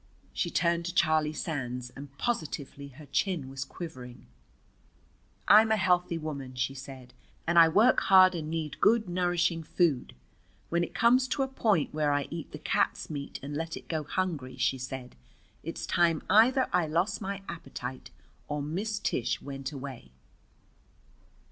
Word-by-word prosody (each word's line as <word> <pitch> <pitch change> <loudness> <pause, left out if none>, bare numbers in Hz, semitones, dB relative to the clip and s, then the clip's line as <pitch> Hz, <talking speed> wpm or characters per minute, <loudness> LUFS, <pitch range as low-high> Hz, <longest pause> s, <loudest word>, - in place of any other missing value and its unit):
She 170 - -1
turned 170 0 +1
to 175 +1 -4
Charlie 155 -3 +3
Sands, 125 -6 -4
and 140 +1 -11
positively 145 - -3
her 140 +3 -13
chin 155 -1 -1
was 135 0 -4
quivering. 130 -9 -9 1.2
"I'm 220 +1 +7
a 220 - +4
healthy 180 -3 +2
woman," 140 -5 -6
she 125 +1 -1
said, 130 -2 -10 0.3
"and 170 +1 +4
I 165 - +9
work 215 +9 +5
hard 185 -1 +6
and 155 -3 -4
need 160 -3 -4
good 220 -2 +4
nourishing 175 -1 +1
food. 160 -5 0 0.5
When 170 0 +1
it's - - -6
come 235 +2 +5
to 265 +2 -1
a - - -1
point 215 - +1
where 150 -1 +1
I 145 -1 0
eat 165 -2 -6
the - - -7
cat's - - -1
meat 140 -2 -5
and 145 +1 -5
let 165 +2 -3
it - - -12
go 155 -2 -2
hungry," 145 -6 -3
she 130 +1 +1
said, 130 0 -7 0.5
"it's 165 - -5
time 170 -2 +2
either 250 +6 +5
I 175 -3 +2
lost 170 +6 0
my 195 0 -4
appetite 130 -6 -7 0.4
or 150 -1 -3
Miss 200 +8 -2
Tish 125 - -1
went 135 -1 -6
away." 135 - -8
160 Hz, 160 wpm, -29 LUFS, 140-180 Hz, 1.2 s, I